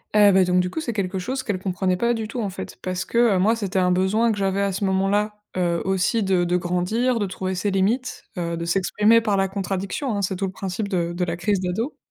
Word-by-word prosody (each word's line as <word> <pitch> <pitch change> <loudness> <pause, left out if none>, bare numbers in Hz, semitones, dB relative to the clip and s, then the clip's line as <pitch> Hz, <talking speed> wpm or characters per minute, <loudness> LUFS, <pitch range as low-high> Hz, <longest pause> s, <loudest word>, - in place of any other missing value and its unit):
Heu, 205 -1 +7
bah 190 -1 +5
donc 180 0 +2
du 180 - -2
coup, 320 - -4
c'est 240 -7 -3
quelque 190 -2 -2
chose 260 +7 -3
qu'elle 205 -6 -2
comprenait 185 -1 -1
pas 235 +4 +2
du 225 -2 -3
tout, 240 +3 -5
en 205 - -2
fait, 190 - -8
parce 185 0 -2
que, 235 - -3 0.2
heu, 185 - +2
moi, 220 +5 +3
c'était 195 -4 -1
un 180 0 +3
besoin 200 +6 +2
que 210 - -2
j'avais 195 0 0
à 200 0 +1
ce 195 +2 -2
moment-là, 195 +2 +1 0.2
heu, 170 -2 +1
aussi 190 +4 +1
de 180 -2 +1
grandir, 185 +8 0
de 205 - 0
trouver 190 0 -3
ses 200 +3 -1
limites, 220 +7 0
heu, 170 -1 -2
de 170 - -4
s'exprimer 210 +5 +3
par 215 -3 +1
la 195 - +2
contradiction, 195 +5 -3
hein. 200 - -1
C'est 190 0 -1
tout 195 - -1
le 185 - -3
principe 195 +2 -4
de 175 -4 -1
de 180 +1 -2
la 170 -1 -2
crise 185 +3 0
d'ado. 190 - -2
195 Hz, 255 wpm, -23 LUFS, 180-210 Hz, 0.2 s, Heu